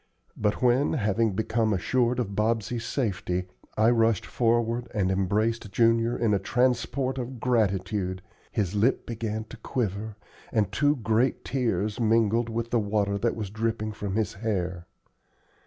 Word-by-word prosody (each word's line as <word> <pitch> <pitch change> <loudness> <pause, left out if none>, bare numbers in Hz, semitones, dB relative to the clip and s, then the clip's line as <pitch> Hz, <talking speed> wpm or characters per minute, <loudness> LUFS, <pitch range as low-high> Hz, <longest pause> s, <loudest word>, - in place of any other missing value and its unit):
But 105 +3 -1
when, 125 +3 +3
having 110 -4 +1
become 110 +2 +1
assured 120 +5 +1
of 105 -6 -2
Bobsey's 115 +2 0
safety, 95 -7 -1 0.3
I 110 +2 +5
rushed 115 -4 +2
forward 120 0 +1
and 95 -3 +1
embraced 105 +3 0
Junior 115 +2 +3
in 115 -3 +2
a 100 - +2
transport 130 +4 0
of 125 0 -5
gratitude, 100 -5 0 0.3
his 100 -5 -1
lip 105 +6 +2
began 110 -1 -3
to 115 +3 -12
quiver 110 -3 -3 0.4
and 105 -4 +1
two 145 0 +2
great 115 +1 0
tears 110 -5 -1
mingled 115 0 +2
with 115 +1 -3
the 120 - +3
water 100 -1 0
that 115 +2 0
was 105 -4 -5
dripping 110 0 -2
from 100 -2 -4
his 110 -3 0
hair. 90 -5 -3
110 Hz, 145 wpm, -27 LUFS, 100-120 Hz, 0.4 s, I